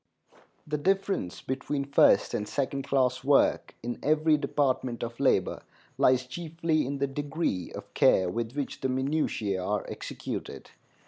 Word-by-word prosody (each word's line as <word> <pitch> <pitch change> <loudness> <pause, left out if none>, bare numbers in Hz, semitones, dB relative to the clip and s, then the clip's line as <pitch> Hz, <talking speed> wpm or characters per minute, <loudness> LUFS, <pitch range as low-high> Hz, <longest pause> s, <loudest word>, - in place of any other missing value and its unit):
The 150 -1 -2
difference 195 - 0
between 140 +2 -2
first 140 - +4
and 105 - -2
second 135 +2 -2
class 130 -2 +1
work 140 0 +3
in 120 0 -4
every 155 +1 +3
department 135 -4 0
of 115 0 -6
labor - - +2 0.3
lies 125 0 +3
chiefly 160 +2 -1
in 140 +1 -3
the 140 - +1
degree 140 - -2
of - - -9
care 95 - +4
with 115 +6 -3
which 140 -1 -4
the 130 - +1
minutiæ 130 -8 -1
are 105 +2 -1
executed. - - -6
135 Hz, 140 wpm, -28 LUFS, 120-150 Hz, 0.3 s, first